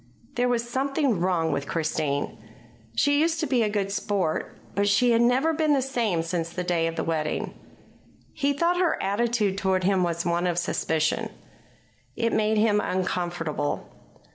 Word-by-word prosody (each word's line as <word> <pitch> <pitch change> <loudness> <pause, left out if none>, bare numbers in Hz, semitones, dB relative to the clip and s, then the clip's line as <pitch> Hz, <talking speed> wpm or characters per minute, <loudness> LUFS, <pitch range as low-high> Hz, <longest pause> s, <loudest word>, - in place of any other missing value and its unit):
There 245 -1 +1
was 240 -1 0
something 265 - 0
wrong 170 -2 +1
with 140 - -2
Christine. 155 -3 -1 0.6
She 285 - +3
used 325 0 +1
to 320 - 0
be 260 -4 +1
a 215 - +2
good 200 -2 -1
sport, 195 -5 -1 0.2
but 200 0 +1
she 240 +5 +4
had 230 0 +4
never 260 +7 +3
been 310 -1 +2
the 275 - +2
same 230 -10 0
since 165 -1 -2
the 180 +2 -4
day 170 -2 +1
of 165 - -4
the - - -2
wedding. 155 -2 -2 0.8
He 285 -1 +1
thought 335 +5 +1
her 355 -3 +2
attitude 205 -1 0
toward 190 -1 +1
him 190 0 +2
was 170 -1 -1
one 175 +1 +1
of 175 -1 -1
suspicion. 160 -2 0 0.9
It 230 0 0
made 215 0 +2
him 210 -1 +3
uncomfortable. 175 -6 -2
200 Hz, 165 wpm, -26 LUFS, 170-245 Hz, 0.9 s, she